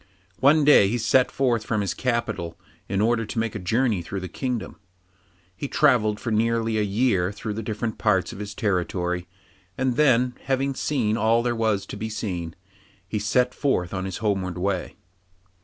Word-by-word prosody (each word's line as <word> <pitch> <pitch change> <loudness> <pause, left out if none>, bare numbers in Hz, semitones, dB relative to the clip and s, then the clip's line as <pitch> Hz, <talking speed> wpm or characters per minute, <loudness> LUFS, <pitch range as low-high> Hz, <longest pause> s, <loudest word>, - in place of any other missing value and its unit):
One 145 +3 +5
day 145 -9 +7
he 115 +5 0
set 125 +3 +3
forth 120 -5 +1
from 110 -1 -1
his 95 -3 -1
capital, 110 -9 -2 0.3
in 100 +1 0
order 115 +1 +2
to 110 - -7
make 115 -1 0
a 105 - -4
journey 110 +2 +1
through 95 +3 -5
his 90 -2 -7
kingdom. 125 -7 -3 0.8
He 140 - -4
travelled 110 -5 +3
for 120 - -4
nearly 115 0 +1
a - - +2
year 100 -3 +1
through 105 +1 -5
the 110 - -4
different 110 0 -4
parts 100 -5 +1
of - - -9
his 105 -1 -6
territory, 90 -3 -1 0.5
and 130 -1 0
then, 125 -4 +4
having 135 +1 0
seen 120 -6 0
all 115 +2 +3
there 120 -1 0
was 110 -3 0
to - - -8
be 110 - -4
seen, 90 -6 -4 0.5
he 105 - -2
set 125 +5 +1
forth 95 -12 0
on 95 -1 -3
his 95 -2 -4
homeward 95 -3 -1
way. 95 0 -2
110 Hz, 180 wpm, -24 LUFS, 95-120 Hz, 0.8 s, day